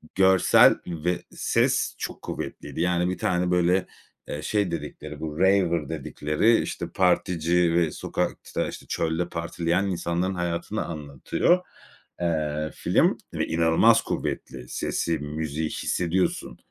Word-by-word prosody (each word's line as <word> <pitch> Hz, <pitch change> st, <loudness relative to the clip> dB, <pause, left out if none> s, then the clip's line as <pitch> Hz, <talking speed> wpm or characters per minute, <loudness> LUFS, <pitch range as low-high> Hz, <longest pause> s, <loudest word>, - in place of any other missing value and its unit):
görsel 95 Hz, -1 st, +6 dB
ve 85 Hz, +1 st, -2 dB
ses -, -, +1 dB
çok -, -, -6 dB
kuvvetliydi. -, -, -5 dB
Yani, 90 Hz, 0 st, +1 dB
bir 90 Hz, -, -2 dB
tane, 90 Hz, 0 st, 0 dB
böyle, 90 Hz, +1 st, +3 dB, 0.4 s
eee, 75 Hz, -, -4 dB
şey 100 Hz, +2 st, 0 dB
dedikleri, 75 Hz, -1 st, -6 dB
bu 80 Hz, 0 st, -5 dB
raver 90 Hz, -5 st, +3 dB
dedikleri, 80 Hz, -, +1 dB
işte, -, -, -4 dB
partici 90 Hz, -2 st, +2 dB
ve 85 Hz, -2 st, +2 dB
sokakta, -, -, -3 dB
işte, -, -, -8 dB
çölde 85 Hz, +2 st, -1 dB
partileyen 85 Hz, +2 st, -1 dB
insanların 90 Hz, +1 st, -1 dB
hayatını 85 Hz, -1 st, -2 dB
anlatıyor. 80 Hz, -, 0 dB, 0.6 s
Eee, 75 Hz, -2 st, -1 dB
film -, -, +2 dB, 0.2 s
ve -, -, -1 dB
inanılmaz 80 Hz, 0 st, +4 dB
kuvvetli 60 Hz, -, -4 dB
sesi, 85 Hz, -2 st, -1 dB
müziği 75 Hz, +1 st, -3 dB
hissediyorsun 90 Hz, +3 st, -1 dB
85 Hz, 120 wpm, -25 LUFS, 80-90 Hz, 0.6 s, görsel